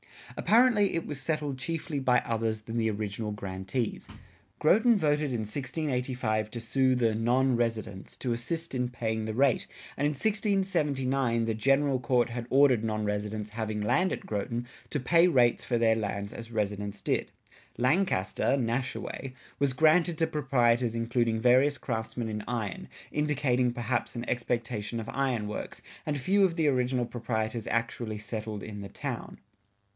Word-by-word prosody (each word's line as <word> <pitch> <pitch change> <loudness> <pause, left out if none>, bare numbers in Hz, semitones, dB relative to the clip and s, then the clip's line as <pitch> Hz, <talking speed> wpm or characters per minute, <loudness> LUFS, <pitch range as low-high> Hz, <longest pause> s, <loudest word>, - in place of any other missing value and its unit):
Apparently 220 -4 +4
it 165 - -1
was 145 -2 -6
settled 150 -3 -2
chiefly 155 +2 -3
by 125 -2 +3
others 110 -1 -1
than 115 +2 -5
the 110 -1 +2
original 105 0 -3
grantees.[57:1] 100 +3 -4 0.4
Groton 220 +8 +5
voted 150 -4 +2
in 120 -3 -1
1685 125 -3 -2
to 120 - -5
sue 130 +3 +2
the 115 -3 +2
"non 125 +4 +2
Residenc" 110 -4 -3
to 125 - -2
assist 160 +9 -3
in 125 -1 0
paying 110 -2 -2
the 110 0 -3
rate, 135 -1 +2 0.3
and 145 - +2
in - - +1
1679 145 - +1
the 115 - 0
General 135 +4 +2
Court 125 -1 +2
had 120 0 -5
ordered 130 -4 +5
non 110 -1 -1
residents 105 +1 -3
having 110 -1 -3
land 180 - +2
at - - -6
Groton 115 +3 -3 0.2
to 145 - -1
pay 170 +7 +5
rates 125 -8 +3
for 120 - +1
their 115 -1 +4
lands 100 -1 -3
as 115 0 -8
residents 105 -2 -3
did.[57:2] - - 0 0.5
Lancaster 130 - +2
(Nashaway) 130 +1 -3 0.3
was 140 -1 +2
granted 160 +3 +4
to 160 - +3
proprietors 120 -5 +2
including 115 -1 +1
various 130 +4 +4
craftsmen 115 -1 -3
in 105 -1 -4
iron, 110 -6 -3 0.2
indicating, 130 -4 +1
perhaps, 120 0 -2
an 120 +1 -4
expectation 115 -2 -2
of 110 - -6
iron 130 -6 0
works, 105 - -6 0.2
and 150 -1 -1
few 195 +9 +3
of 175 -3 0
the 160 -3 +2
original 125 -2 +1
proprietors 115 -2 -3
actually 115 -1 -2
settled 105 0 -5
in 105 -1 -7
the 100 - -7
town. - - -5
120 Hz, 155 wpm, -29 LUFS, 110-140 Hz, 0.5 s, Groton